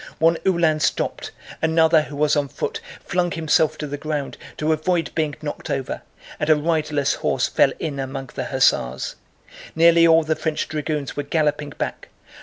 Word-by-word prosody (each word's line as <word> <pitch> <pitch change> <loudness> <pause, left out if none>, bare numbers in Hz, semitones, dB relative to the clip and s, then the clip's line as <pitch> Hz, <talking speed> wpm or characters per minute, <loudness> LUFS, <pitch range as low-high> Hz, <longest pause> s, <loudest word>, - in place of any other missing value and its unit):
One 165 +1 +3
Uhlan 170 -4 +3
stopped, - - -1 0.3
another 160 0 +4
who 150 -1 -8
was 150 +1 +2
on 145 -1 +1
foot - - -4 0.2
flung 175 0 0
himself 160 -1 +1
to 150 - -4
the 145 0 -5
ground 150 -2 -3 0.2
to 155 +1 +1
avoid 165 +1 0
being 155 -3 -1
knocked 145 - -5
over, 135 -2 -3 0.4
and 150 - -1
a 155 - +7
riderless 150 -2 0
horse - - 0
fell - - +3
in 145 -3 -4
among 135 -1 -5
the - - -4
hussars. 65 +1 +1 0.6
Nearly 170 +1 +6
all 165 0 +5
the 155 0 0
French 155 -1 -2
dragoons 150 -2 -3
were 145 - -1
galloping 150 0 0
back. - - -4
155 Hz, 170 wpm, -22 LUFS, 145-160 Hz, 0.6 s, a